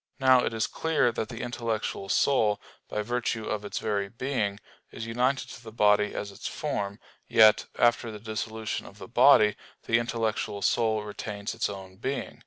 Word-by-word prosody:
Now 130 -2 +5
it - - 0
is 110 -1 0
clear 160 -6 +1
that 110 - -4
the 115 -2 -6
intellectual 115 -5 -3
soul, 110 -6 +3 0.3
by 105 - -2
virtue 120 -1 -2
of 105 -1 -3
its 105 - -5
very 100 -2 -1
being, 115 -4 -2 0.3
is 110 - -7
united 125 +4 0
to - - -10
the 110 - -9
body 105 -1 +3
as 100 - -4
its - - -7
form; 100 0 -3 0.3
yet, 110 -1 +6
after 120 0 +3
the 110 - -7
dissolution 110 +1 -4
of - - -14
the - - -9
body, 105 -1 +6 0.3
the 115 - +3
intellectual 110 -3 -2
soul 110 -2 +2
retains 105 0 -5
its 115 - -1
own 95 -2 -9
being. 135 +6 -4
110 Hz, 175 wpm, -28 LUFS, 105-120 Hz, 0.3 s, yet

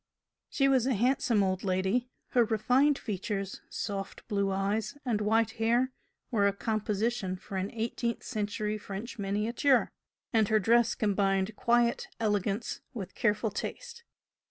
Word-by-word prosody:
She 275 - +2
was 260 -2 +3
a 265 - +2
handsome 240 -1 +2
old 185 0 -1
lady; 190 +6 0 0.2
her 245 - +4
refined 250 +6 +3
features, 195 -2 -4
soft 195 -2 -5
blue 200 -3 0
eyes 205 +6 -1
and 225 -4 0
white 220 +1 +2
hair 240 +3 +3 0.4
were 205 -4 +3
a 200 - +1
"composition" 215 -1 -1
for 190 +1 -9
an 190 +1 -1
eighteenth 235 +1 -2
century 210 0 -2
French 210 +4 -7
miniature, 220 +7 +2 0.4
and 220 -2 +4
her 220 - +3
dress 230 +3 +3
combined 195 -1 +1
quiet 235 +1 +2
elegance 205 0 -1
with 195 -5 -6
careful 215 -2 +1
taste. 470 - -6
215 Hz, 135 wpm, -30 LUFS, 200-235 Hz, 0.4 s, her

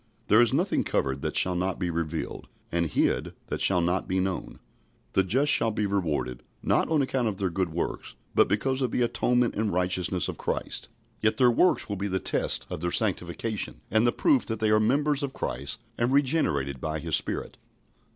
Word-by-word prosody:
"There 110 +3 +7
is 120 - +4
nothing 170 +9 +1
covered, 65 0 -1
that - - -3
shall 90 - +2
not 90 +1 -1
be 90 -2 -2
revealed; 80 -1 -4 0.2
and 85 0 +1
hid, - - 0
that - - -3
shall 95 -2 +3
not 90 +2 0
be 95 0 0
known." 95 0 -3 0.5
The 95 - +3
just 130 +10 +2
shall 115 - +4
be 105 -1 -1
rewarded, 75 -11 -1 0.2
not - - +2
on 155 -3 +3
account 130 -2 0
of 105 -3 -2
their 95 -2 -1
good 90 -1 -1
works, 85 - -4 0.2
but - - +5
because 130 +6 0
of 130 - +1
the 125 - +1
atonement 120 0 +1
and 105 0 0
righteousness 90 0 0
of - - -6
Christ; - - -3 0.3
yet 110 0 +2
their 125 -2 +5
works 180 +10 +3
will 100 - -3
be 100 +2 -2
the 95 -1 -1
test - - -1
of - - -6
their 85 - 0
sanctification 100 +2 -1
and 110 +3 +4
the - - +4
proof 285 - +2
that 110 -2 -3
they 110 -1 +2
are 110 - +5
members 145 +6 +2
of 140 -2 -3
Christ 70 - -4 0.2
and 120 +2 +1
regenerated 125 - +1
by 80 0 -2
His 75 - 0
Spirit. - - -1
100 Hz, 200 wpm, -27 LUFS, 85-120 Hz, 0.5 s, There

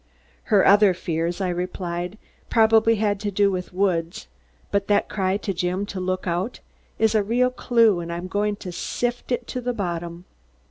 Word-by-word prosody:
'" - - -33
"Her 205 -4 +4
other 200 -2 +6
fears," 170 +1 -2
I 185 - 0
replied, 180 +1 -4 0.3
"probably 225 0 +4
had 205 -2 0
to 210 0 -2
do 200 0 +2
with 180 -1 -4
Woods. 180 -3 -1 0.5
But 200 -1 0
that 205 -1 +2
cry 190 -1 0
to 205 -1 -3
Jim 180 +3 -1
to 200 -2 -6
'Look 185 0 -2
out!' 180 +6 -2 0.4
is 220 -1 +2
a 215 - +3
real 245 +5 +1
clue 230 -6 +3
and 170 0 -5
I'm 170 +1 -4
going 205 +2 0
to 185 -2 -8
sift 245 +8 -3
it 245 0 -1
to 250 - -3
the 245 0 -2
bottom." 175 -3 -4
195 Hz, 185 wpm, -23 LUFS, 180-215 Hz, 0.5 s, other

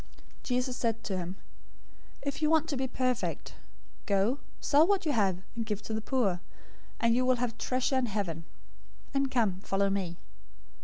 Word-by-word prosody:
019:021 - - -25
Jesus 250 0 0
said 230 -1 0
to 195 - -2
him, 180 0 -3 0.9
"If 280 +1 -3
you 305 - +3
want 320 0 +4
to 290 - 0
be 265 0 0
perfect, 250 - -1 0.5
go, 205 +7 +2 0.2
sell 305 +3 +5
what 395 -3 +2
you 305 - +2
have, 195 -7 +2
and 230 - -1
give 215 -2 -3
to 220 - -4
the 220 - -1
poor, 215 -8 +1 0.6
and 230 0 +4
you 250 +2 +3
will 255 0 +4
have 240 -2 -1
treasure 260 +2 +1
in 250 - 0
heaven; 180 -6 -2 0.7
and 275 -1 +2
come, 215 -8 +1
follow 195 0 +1
me." 185 -4 -2
230 Hz, 175 wpm, -30 LUFS, 195-260 Hz, 0.9 s, sell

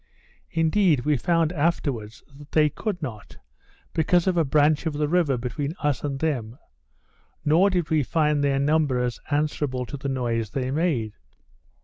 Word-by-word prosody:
Indeed 165 -2 +2
we 150 -1 +3
found 165 +3 +1
afterwards 140 -9 -2
that 145 0 -15
they 155 -1 +4
could 195 -7 -4
not, 110 -7 -7 0.6
because 170 +2 +2
of 185 -2 +1
a 170 - +3
branch 150 +2 +2
of 160 - -1
the 150 0 0
river 155 -5 +2
between 140 +6 -4
us 145 -2 0
and 140 -2 -2
them, 130 -7 -2 0.9
nor 165 +7 +4
did 175 -5 -1
we 155 -1 +3
find 150 +1 +1
their 140 -1 +2
numbers 140 -4 +1
answerable 145 -3 -1
to 145 - -7
the 140 +1 -4
noise 120 -4 -1
they 130 +2 -2
made. 135 -9 0
150 Hz, 155 wpm, -24 LUFS, 130-160 Hz, 0.9 s, they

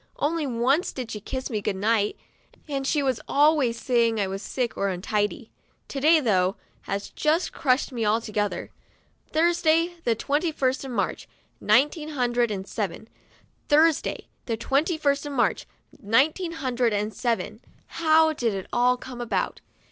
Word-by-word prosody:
Only 310 0 -1
once 260 +7 +1
did 250 -3 -6
she 210 - -4
kiss 260 +5 -5
me 215 -2 -1
good 195 - -1
night, 210 +1 +1 0.5
and 275 -2 -2
she 295 -1 +1
was 260 -4 0
always 285 -5 +3
saying 230 -3 +2
I 200 - +2
was 195 +1 -5
sick 245 +1 -3
or 200 - 0
untidy. 205 +4 -2 0.4
To 275 - -4
day, 315 +3 +5
though, 190 -7 +2 0.3
has 200 +1 -3
just 320 +3 +1
crushed 265 -2 +1
me 235 -3 -3
altogether. 210 -1 -1 0.6
"Thursday, 335 +1 +2
the 230 - +2
twenty 295 +8 0
first 265 -3 0
of 270 - -6
March, 245 - -2 0.3
nine 245 +8 +4
teen 310 -3 -7
hundred 245 -4 +1
and 195 -2 -4
seven. 210 +1 -4 0.6
Thursday, 310 +1 +3 0.2
the 230 -2 -1
twenty 285 +8 0
first 285 -1 0
of 290 - -5
March, - - 0 0.3
nineteen 300 - +2
hundred 250 -7 0
and 210 +1 -1
seven." 240 -2 -2 0.2
How 320 -1 +3
did 235 -8 -1
it 190 - -5
all 250 +1 +3
come 250 -1 -8
about 240 - -2
250 Hz, 160 wpm, -25 LUFS, 220-300 Hz, 0.6 s, day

